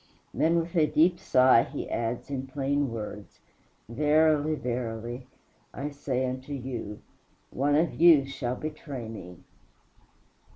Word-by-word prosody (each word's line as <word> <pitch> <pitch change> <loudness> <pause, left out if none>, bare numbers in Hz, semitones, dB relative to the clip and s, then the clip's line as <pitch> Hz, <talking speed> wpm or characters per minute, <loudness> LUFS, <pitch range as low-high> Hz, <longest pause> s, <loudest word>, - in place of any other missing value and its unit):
Then 165 +2 +2
with 170 +2 -5
a 155 -3 +4
deep 170 +4 +3
sigh 130 -2 +5
he - - -5
adds 115 +4 -3
in 135 -1 -3
plain 140 +1 -1
words, 105 -2 -7 0.5
"Verily, 150 +4 +2
verily, 120 -1 -4 0.5
I 145 +2 -4
say 130 -2 -2
unto 130 +3 -5
you, 125 -6 -6 0.5
one 145 +2 +1
of 160 +2 +2
you 160 -5 +7
shall 130 -2 -4
betray 145 -5 -6
me." 90 -6 -9
135 Hz, 125 wpm, -27 LUFS, 120-150 Hz, 0.5 s, you